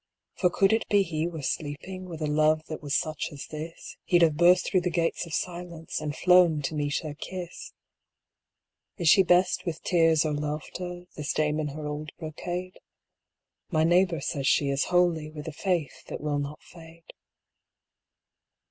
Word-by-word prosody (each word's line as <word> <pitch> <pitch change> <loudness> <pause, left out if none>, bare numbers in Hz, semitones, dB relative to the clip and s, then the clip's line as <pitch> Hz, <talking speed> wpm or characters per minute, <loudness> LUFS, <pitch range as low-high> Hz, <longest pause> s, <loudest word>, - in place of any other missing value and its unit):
"For 180 - +2
could 195 +3 +3
it 225 - 0
be 205 -1 +4
he 165 -2 -2
were 160 -4 -6
sleeping. 160 +7 -4
With 160 -2 -5
a - - +1
love 155 +1 +2
that 155 - -5
was 145 -1 -2
such 155 -1 -1
as 145 -2 -7
this 160 +2 -8
He'd 175 -2 +4
have 160 -3 +4
burst 175 +2 +5
through 185 - +2
the 180 - 0
gates 170 0 -1
of 165 - -9
silence, 170 -3 -4
And 150 -1 -3
flown 175 -4 +5
to 135 - -2
meet 145 -1 -1
her 155 -2 -5
kiss." 175 +3 -7 1.3
Is 175 -5 -1
she 195 - +8
best 180 0 +3
with 165 -3 -5
tears 165 -3 +3
or 155 - 0
laughter, 155 +4 -4
This 150 -1 -3
dame 150 0 +1
in 155 - -1
her 150 +1 -6
old 150 +1 -5
brocade? 175 +3 -5 0.9
My 155 -3 +2
neighbour 175 -1 +3
says 140 -1 -2
she 140 0 +3
is 140 0 +1
holy, 175 -4 +2
With 155 0 -9
a 160 - -5
faith 175 -3 -2
that - - -5
will 145 -1 -1
not 145 +1 -5
fade. 165 -1 -15
160 Hz, 175 wpm, -27 LUFS, 150-175 Hz, 1.3 s, she